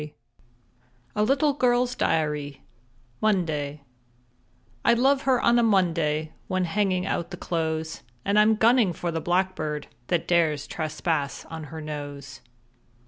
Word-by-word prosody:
_ 150 0 -8 1.0
A 210 - +1
LITTLE 275 +5 +2
GIRL'S 250 -2 +2
DIARY 150 - -1 0.6
Monday 155 -8 0 1.0
_I 235 - +4
love 270 +2 +3
her 255 -2 +4
on 235 +1 +4
a - - +4
Monday 165 -8 +1 0.2
When 185 -1 0
hanging 185 0 0
out 170 - -2
the - - -7
clothes, 160 -1 -2 0.2
And 200 +1 +3
I'm 215 +1 +5
gunning 225 -3 +4
for 170 +1 -3
the 165 -1 -2
blackbird 175 -4 -1 0.2
That 175 -2 0
dares 155 -4 +2
trespass 155 -2 -2
on 160 -1 -6
her 160 +2 -8
nose. 145 -3 -7
170 Hz, 135 wpm, -25 LUFS, 150-210 Hz, 1.0 s, I'm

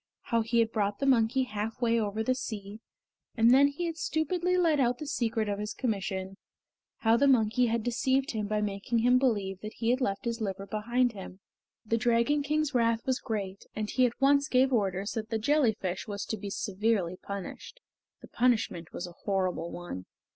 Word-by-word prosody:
How 230 -1 0
he 230 +1 -1
had 225 -1 +3
brought 205 -2 0
the 275 - -2
monkey 260 0 +3
half 215 -2 -4
way 235 -1 +2
over 215 0 -1
the 255 - +2
sea, 210 -4 -6 0.6
and 230 +1 +6
then 275 +2 +7
had 330 +3 -3
stupidly 350 +4 0
let 330 -5 +3
out 245 -2 +2
the 305 - -6
secret 225 -6 -1
of 205 0 -2
his 210 0 -4
commission; 195 -4 -3 0.6
how 225 0 +4
the 280 - +4
monkey 245 -1 +3
had 230 -1 0
deceived 260 +3 +1
him 215 -3 -3
by 210 0 0
making 205 +3 -2
him 250 +1 +5
believe 205 -7 0
that 215 0 -7
he 230 +1 0
had 255 +2 0
left 200 -3 -1
his 235 -1 -2
liver 195 -2 -3
behind 240 +4 0
him. 190 -3 -10 0.5
The 225 +1 +1
Dragon 235 +5 +2
King's 300 0 0
wrath 230 -2 +1
was 260 -1 0
great, 200 -5 -4
and 215 -1 -3
he 255 -1 +4
at 235 - -8
once 280 +1 +4
gave 260 +1 +3
orders 195 -2 0
that 220 -1 -4
the 225 - 0
jellyfish 220 -8 0
was 205 -1 -4
to - - -3
be 200 0 -6
severely 195 -2 -1
punished. 200 - -8 0.4
The - - -10
punishment 230 -9 0
was 175 - -4
a 175 - -10
horrible 185 -4 -1
one. 135 - -7
225 Hz, 195 wpm, -29 LUFS, 200-255 Hz, 0.6 s, then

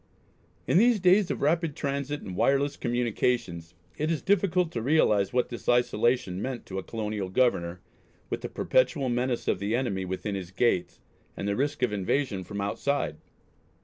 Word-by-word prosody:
In 175 - +4
these 235 0 +4
days 185 +1 +4
of - - -3
rapid 160 0 +1
transit 140 +1 -3
and 95 - -7
wireless 140 +6 +2
communications, 115 -8 -1 0.2
it 155 +1 0
is 165 -2 -1
difficult 180 -3 +2
to 115 - -3
realise 110 -7 +3
what 125 0 +1
this 120 - -5
isolation 120 -5 +2
meant 130 -1 -4
to 95 0 -4
a - - -6
colonial 105 -3 -4
Governor, 90 -6 +1 0.5
with - - -4
the - - -5
perpetual 130 +1 +1
menace 120 0 -1
of - - +1
the 100 +3 0
enemy 115 -7 -1
within 95 +3 -4
his 95 -3 -5
gates, 95 -2 0 0.4
and 100 - -3
the 100 - 0
risk 140 +3 -1
of 120 -4 +1
invasion 100 +1 -1
from 100 +2 -5
outside. 100 - -1
120 Hz, 170 wpm, -27 LUFS, 100-140 Hz, 0.5 s, In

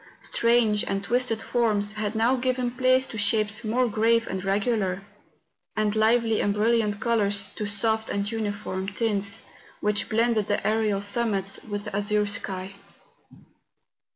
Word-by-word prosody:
Strange 230 -3 +2
and 195 0 -2
twisted 235 0 +1
forms 215 -4 +1
had 215 0 -3
now 230 +4 +3
given 255 -1 -1
place 255 +1 +2
to 220 - -7
shapes 210 +1 +1
more 240 +3 +1
grave 225 +1 +2
and 190 -1 -4
regular; 195 -1 0 0.7
and 215 -1 +1
lively 225 0 +2
and 205 0 0
brilliant 215 -1 +1
colours 205 -4 +1
to 210 - -5
soft 220 +2 0
and 200 +1 -2
uniform 205 -3 -3
tints, 205 -1 -1 0.4
which 210 0 0
blended 225 -2 +1
the 205 - -1
aerial 215 -2 +1
summits 200 -2 +1
with 205 -1 -4
the - - -6
azure 210 +1 +1
sky. 190 -2 -3
215 Hz, 140 wpm, -25 LUFS, 205-230 Hz, 0.7 s, now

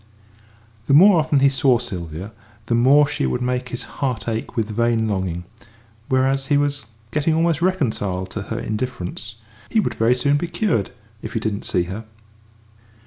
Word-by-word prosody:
The 140 - +5
more 185 +2 +7
often 150 -3 +2
he 140 - +6
saw 135 -2 +3
Sylvia 90 -4 -6 0.3
the 115 - -1
more 135 +5 +5
she 145 - -1
would 125 - -1
make 125 0 -1
his 120 - -4 0.2
heart 125 -6 -1
ache 115 +1 -3
with 110 -1 0
vain 115 0 +1
longing 95 -4 -2 0.7
whereas 135 +1 +1
he 145 - +3
was 145 -2 0 0.3
getting 155 +3 +1
almost 165 -1 +1
reconciled 105 - -1
to 105 - -4
her 110 - -2
indifference; 110 -2 -4 0.3
he 225 - +2
would - - 0
very 115 +2 +2
soon 140 +3 +2
be 175 - -2
cured 165 - 0 0.3
if 110 - -7
he - - 0
didn't 110 -2 -3
see 90 - +1
her. 95 +6 -6
125 Hz, 170 wpm, -21 LUFS, 110-145 Hz, 0.7 s, more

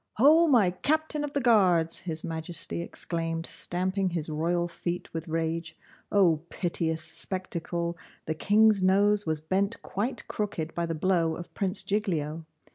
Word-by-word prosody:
'Ho! 310 +8 +6
my 230 - +5
captain 305 - 0
of 295 -1 -4
the 285 - +1
guards!' 185 -9 +3
His 160 -3 -1
Majesty 165 +1 -2
exclaimed, 165 -1 -3
stamping 185 +3 -1
his 165 -3 -3
royal 170 +3 0
feet 175 0 -5
with 165 0 -4
rage. 165 0 -2 0.3
O 185 -6 +4
piteous 160 -2 -1
spectacle! 170 0 -3 0.3
the 160 - -1
King's 210 +4 +4
nose 200 +1 +3
was 155 -1 -1
bent 195 +7 0
quite 220 +7 -3
crooked 175 -7 -3
by 170 0 -1
the 165 - -2
blow 165 -1 +1
of 175 - -9
Prince 195 0 -2
Giglio! 165 -6 -2
175 Hz, 145 wpm, -28 LUFS, 165-200 Hz, 0.3 s, Ho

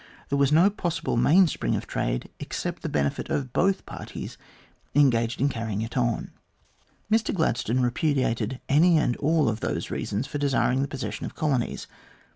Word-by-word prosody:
There 140 - +1
was 140 0 +3
no 170 +7 +5
possible 170 -5 -2
mainspring 160 +9 +3
of - - -3
trade, - - -2
except - - -4
the - - -3
benefit 70 -1 -1
of 130 -4 -2
both 195 +1 +1
parties - - -7 0.6
engaged 120 -5 +3
in 140 - +3
carrying 110 -5 -3
it 115 - -7
on. 120 -3 0 0.8
Mr 225 0 +2
Gladstone 130 - 0
repudiated 125 -2 0
any 165 +4 +5
and 125 -5 +1
all 155 0 +2
of 110 -1 -1
those - - -3
reasons 105 +6 -2
for 145 - -5
desiring 135 -2 +2
the 140 - 0
possession 135 -2 -5
of - - -10
colonies. 140 -7 -1
135 Hz, 160 wpm, -26 LUFS, 115-155 Hz, 0.8 s, no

